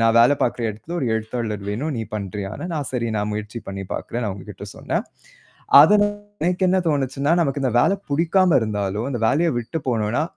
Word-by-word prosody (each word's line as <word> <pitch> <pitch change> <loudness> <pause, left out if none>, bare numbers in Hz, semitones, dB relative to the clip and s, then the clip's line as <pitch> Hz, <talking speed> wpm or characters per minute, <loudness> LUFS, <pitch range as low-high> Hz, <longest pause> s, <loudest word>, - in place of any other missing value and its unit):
நான் 115 0 +4
வேல 120 +5 +6
பாக்குற 120 0 0
இடத்துல 110 +11 -8
ஒரு 130 - -1
எழுத்தாளர் 110 -2 -3
வேணும். 145 +8 -2
நீ 115 - -2
பண்றியா? 100 -1 -4 0.2
நான் 145 -4 -3
சரி 120 -2 -1
நான் 105 0 -1
முயற்சி 105 +2 -5
பண்ணி 95 0 -5
பார்க்குறேன்னு 120 -2 -3
அவுங்ககிட்ட 95 -1 -9
சொன்னேன். - - -2 0.8
அதனா 205 +7 +6 0.4
எனக்கு 180 +2 +1
என்ன 185 - +3
தோணுச்சுன்னா, 140 0 0
நமக்கு 140 -3 0
இந்த 125 - +1
வேலை 195 - +3 0.2
புடிக்காம 170 +3 +3
இருந்தாலோ! 105 -1 -2
இந்த 120 - -3
வேலைய 165 +6 +2
விட்டுப் 135 +5 -6
போனோன்னா, 115 +2 0
120 Hz, 175 wpm, -22 LUFS, 105-150 Hz, 0.8 s, வேல